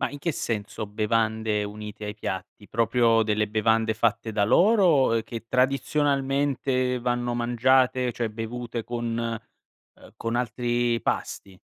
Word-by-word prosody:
Ma - - 0
in 145 - -8
che 170 +3 -1
senso 110 -3 -4
bevande 110 0 0
unite 105 +1 -7
ai 105 0 -5
piatti, 100 0 -6
proprio 115 0 +3
delle 105 -1 +1
bevande 110 +1 +1
fatte 110 0 0
da 105 -1 +2
loro, 175 - +4
ehm, 115 - +1
che 115 0 -8
tradizionalmente 135 -1 +1
vanno 120 0 -1
mangiate, 125 +1 +2
cioè 120 -2 -2
bevute, 115 +2 -5
con 120 -1 -3
ehm, 115 -1 -9
con 115 +1 -3
altri 120 0 0
pasti? 95 -2 -3
115 Hz, 135 wpm, -25 LUFS, 110-125 Hz, -, loro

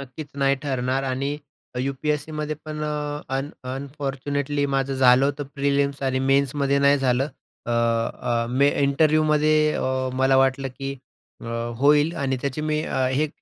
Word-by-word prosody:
नक्कीच 140 +3 -8
नाही 140 0 +3
ठरणार 130 -1 -1
आणि 135 +2 -2 0.4
यू-पी-एस-सीमध्ये 150 +3 -2
पण 155 -1 -5
अ, 150 -1 -3 0.2
अन 140 +2 -3 0.2
अनफॉर्च्युनेटली 140 +1 -3
माझं 135 0 0
झालं 130 0 +5
होतं 145 +1 -1
प्रिलिम्स 140 0 0
आणि 130 -1 0
मेन्समध्ये 140 +1 +2
नाही 140 0 +4
झालं. 130 +1 +1 0.4
अ, - - -3
अ, 115 0 0
मी 140 +3 +3
इंटरव्ह्यूमध्ये 155 +1 +3 0.2
अ, - - -2 0.3
मला 130 +1 +3
वाटलं, 135 0 +2
की 135 0 -4 0.4
अ, - - -9 0.3
होईल 145 +4 +4
आणि 135 -4 -1
त्याची 140 +2 -3
मी 155 0 0
अ, - - -4
हे 145 +4 0
140 Hz, 145 wpm, -23 LUFS, 130-145 Hz, 0.4 s, झालं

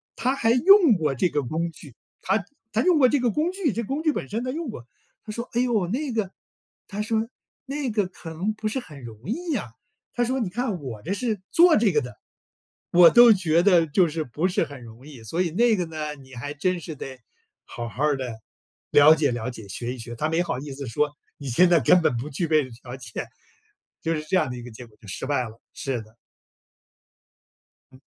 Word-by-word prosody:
他 255 +4 0
还 225 -4 +2
用 340 - +7
过 155 -7 0
这 175 +8 +1
个 150 - 0
工 160 +6 -2
具， 145 -6 -14 0.3
他 195 +2 +1 0.3
他 220 - +1
用 345 -2 +4
过 255 -2 +6
这 290 - +2
个 245 -2 +1
工 310 - 0
具 365 - -1
这 230 - -2
工 275 +8 -3
具 310 -2 +2
本 - - -5
身 225 +3 -2
他 255 - -2
用 325 +3 -4
过。 120 - -8 0.4
他 215 - -6
说： 235 +3 -5
“唉 240 - +1
呦， 225 -8 +1
那 265 - -2
个” 215 -4 -1 0.6
他 205 +1 -4
说， 220 +1 0 0.4
“那 275 -1 -3
个 210 -3 +1
可 180 -2 -11
能 185 +7 -2
不 215 0 -4
是 220 +5 -1
很 150 - -12
容 115 -2 -9
易 325 - -2
啊”， 125 - -6 0.4
他 240 - +1
说， 260 +3 0
“你 215 -7 -1
看 225 -3 -2
我 120 -6 -7
这 180 - -3
是 220 -3 -2
做 345 0 +6
这 215 -2 +3
个 150 - +3
的， 125 -2 -8 0.8
我 175 -1 +8
都 240 -1 +8
觉 170 -4 +2
得 180 -4 +5
就 175 +4 +3
是 160 0 -3
不 150 +8 -1
是 180 - +1
很 135 -3 -11
容 115 +4 -13
易， 140 -6 -12
所 165 +10 -2
以 170 - -2
那 230 +6 +3
个 180 -3 -1
呢， 155 -2 -5
你 135 -2 -16
还 145 +4 -5
真 180 +4 0
是 160 -1 -7
得 130 -2 -8 0.5
好 120 0 -6
好 145 +7 0
的 125 -4 -6 0.5
了 145 +2 +8
解 150 -4 +1
了 120 +1 -3
解， 110 -4 -10
学 120 +6 -4
一 125 - -12
学。” 120 +1 -7
他 155 - 0
没 165 +2 +1
好 165 -8 -3
意 145 0 -7
思 140 -1 -7
说： 145 +6 0 0.3
“你 140 - -8
现 175 +10 +5
在 170 -2 +5
根 180 - +5
本 125 -7 +1
不 130 +6 -5
具 160 +4 -2
备 155 -3 +2
条 120 +2 -10
件。” 115 -4 -6 0.7
就 165 0 0
是 155 - -4
这 155 - -1
样 130 - +1
的 125 - -6
一 120 - -8
个 125 - -9
结 120 +2 -11
果， 105 - -24
就 110 - -16
失 95 - -5
败 145 -3 +1
了， 115 - -16
是 130 -4 -3
的。 110 +1 -17 1.8
嗯。 130 - -18
165 Hz, 245 characters per minute, -24 LUFS, -, 1.8 s, 我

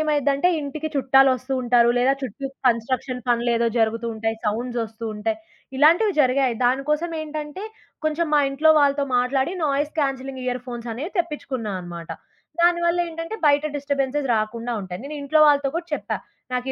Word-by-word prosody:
ఏమైద్దంటే 290 +1 +2
ఇంటికి 295 +2 -4
చుట్టాలొస్తూ 270 -1 +3
ఉంటారు, 240 -1 +4
లేదా 260 +2 +4
చుట్టూ 265 +3 -6 0.2
కన్‌స్ట్రక్షన్ 250 +1 0
పనులే 240 0 +2
ఏదో 235 - +2
జరుగుతూ 225 +1 +1
ఉంటాయి, 225 0 -2
సౌండ్స్ 240 +3 -1
వస్తూ 225 +1 -8
ఉంటాయి, 215 +1 -2 0.4
ఇలాంటివి 335 +9 +5
జరిగాయి. 260 -2 +2
దానికోసం 300 +7 +1
ఏంటంటే, 305 +3 -6 0.4
కొంచెం 315 +2 0
మా 295 - +5
ఇంట్లో 310 +3 +4
వాళ్ళతో 280 0 +3
మాట్లాడి, 265 +7 +1
నాయిస్ 290 +1 0
క్యాన్సిలింగ్ 270 -2 -3
ఇయర్ 250 -1 -2
ఫోన్స్ 240 -1 -6
అనేవి 300 - -6
తెప్పిచుకున్నా 270 - -3
అనమాట. 170 -1 -8 0.5
దానివల్ల 345 0 +3
ఏంటంటే, 330 +5 -6
బయట 290 +1 +4
డిస్టర్బెన్సెస్ 280 -1 -1
రాకుండా 230 +3 -2
ఉంటాయి. 180 -1 -7
నేనింట్లో 295 +1 0
వాళ్ళతో 285 -1 +4
కూడా 340 0 -4
చెప్పా. - - -3 0.4
"నాకు 250 +1 -2
270 Hz, 145 wpm, -23 LUFS, 240-295 Hz, 0.5 s, ఇలాంటివి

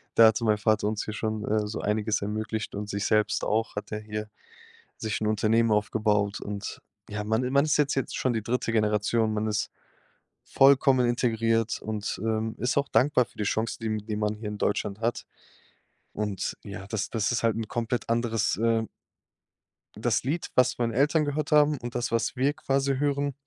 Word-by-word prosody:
Da 115 - +8
hatte 110 +1 +1
mein 105 -1 +3
Vater 110 0 +1
uns 105 -1 -1
hier 110 - -5
schon, 110 -1 -3
äh, 105 0 0
so 105 - -4
einiges 105 0 0
ermöglicht 110 +2 -3
und 105 0 -5
sich 100 0 -2
selbst 110 -1 +2
auch 110 +1 0
hat 105 0 -6
er 105 - -3
hier 105 0 -5 0.7
sich 110 -1 -3
'n - - 0
Unternehmen 110 +2 +2
aufgebaut. 105 -1 +1
Und 100 -1 -6 0.3
ja, 105 0 -3
man 110 +3 +1
i 125 - -1
man 140 +2 +4
ist 155 - +2
jetzt 150 -1 +2
jetzt 135 - -2
schon 130 - +1
die 110 -2 -2
3. 120 0 -1
Generation, 110 +1 +1
man 110 0 -1
ist 105 -1 -1 0.7
vollkommen 135 -2 +5
integriert 115 -2 +1
und, 110 -1 -4
ähm, 110 0 -1
ist 125 +4 0
auch 140 0 +2
dankbar 130 -2 +3
für - - -25
die 105 - -1
Chance, 110 +3 -1
die 110 - -2
m 110 - 0
die 110 - -3
man 105 0 0
hier 105 0 -7
in 105 - -5
Deutschland 100 0 -1
hat. 115 0 -1 0.9
Und 105 -3 -3
ja, 100 -1 -8
das 110 -2 -3
das 110 +1 0
ist 120 - 0
halt 115 -2 +2
'n 115 -1 -3
komplett 120 +1 -2
anderes, 115 -2 +1
äh 115 0 +2 1.1
das - - 0
Lied, 150 +7 -2
was 130 0 +3
meine 115 -2 0
Eltern 150 +4 +3
gehört 145 +1 -2
haben 150 0 +5
und 120 -1 -7
das, 120 0 -1
was 115 +2 0
wir 135 +3 +2
quasi 140 -3 0
hören, 140 0 0
110 Hz, 195 wpm, -27 LUFS, 105-125 Hz, 1.1 s, Da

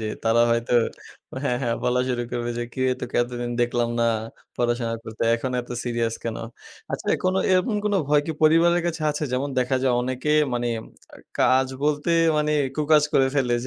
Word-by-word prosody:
যে 110 - -3 0.2
তারা 115 +1 +3
হয়তো 115 0 0 0.7
হ্যাঁ, 125 -3 +1
হ্যাঁ, 115 -1 0
বলা 125 0 +2
শুরু 120 -1 -1
করবে 120 -1 -2
যে 120 - -1
কিরে 130 0 +1
তোকে 125 - -4
এতদিন 120 0 -4
দেখলাম 120 0 +1
না - - +3 0.5
পড়াশোনা 120 -1 0
করতে, 110 0 -6
এখন 130 +3 -3
এত 120 - -13
সিরিয়াস 115 -1 -1
কেন? 115 -1 -3 0.6
আচ্ছা, - - -4 0.2
কোনো 185 +1 +2
এরকম 185 +4 +2
কোনো 205 -1 +1
ভয় 150 0 +4
কি 160 - -2
পরিবারের 170 +2 +4
কাছে 165 -2 -3
আছে 150 +1 -3
যেমন 135 +3 -1
দেখা 125 +1 +1
যায়, 130 -2 +2
অনেকে 130 +4 -2 0.2
মানি 120 0 -1 0.7
কাজ 130 +1 +4 0.2
বলতে, 150 +2 0 0.3
মানি 150 0 +1 0.2
কু-কাজ 150 0 +4
করে 135 - +4
ফেলে, 130 -4 +1
125 Hz, 175 wpm, -24 LUFS, 120-150 Hz, 0.7 s, ভয়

